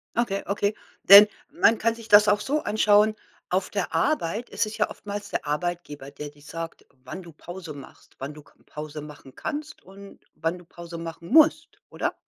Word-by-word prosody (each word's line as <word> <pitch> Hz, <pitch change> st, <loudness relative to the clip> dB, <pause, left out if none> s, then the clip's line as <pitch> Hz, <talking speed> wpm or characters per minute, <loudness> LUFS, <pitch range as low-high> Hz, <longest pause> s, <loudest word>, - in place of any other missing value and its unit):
Okay, 215 Hz, -4 st, 0 dB
okay, 205 Hz, +1 st, 0 dB, 0.3 s
denn 200 Hz, +2 st, +10 dB, 0.2 s
man 225 Hz, -, +4 dB
kann 230 Hz, +1 st, +1 dB
sich 230 Hz, -1 st, -12 dB
das 210 Hz, -1 st, +7 dB
auch 210 Hz, 0 st, +3 dB
so 295 Hz, +7 st, -1 dB
anschauen. 210 Hz, 0 st, +3 dB, 0.3 s
Auf 185 Hz, +1 st, 0 dB
der 200 Hz, -3 st, -3 dB
Arbeit 235 Hz, -, 0 dB
ist -, -, 0 dB
es 215 Hz, +1 st, -7 dB
ja 210 Hz, -, +1 dB
oftmals 205 Hz, 0 st, -7 dB
der -, -, -3 dB
Arbeitgeber, 150 Hz, -3 st, -4 dB
der 150 Hz, -, -7 dB
dir 145 Hz, 0 st, -21 dB
sagt, 165 Hz, +3 st, -8 dB, 0.2 s
wann 130 Hz, +8 st, -7 dB
du 170 Hz, -, -12 dB
Pause 175 Hz, 0 st, -9 dB
machst, 140 Hz, -2 st, -14 dB
wann 135 Hz, +3 st, -5 dB
du 150 Hz, -, -12 dB
k -, -, -24 dB
Pause 150 Hz, 0 st, -7 dB
machen 145 Hz, -3 st, -12 dB
kannst 305 Hz, +1 st, -6 dB
und 195 Hz, +1 st, -14 dB, 0.2 s
wann 165 Hz, +2 st, -2 dB
du 175 Hz, -, -15 dB
Pause 170 Hz, 0 st, -10 dB
machen 165 Hz, 0 st, -8 dB
musst, 315 Hz, +4 st, +4 dB
oder? -, -, -3 dB
190 Hz, 190 wpm, -25 LUFS, 165-210 Hz, 0.3 s, denn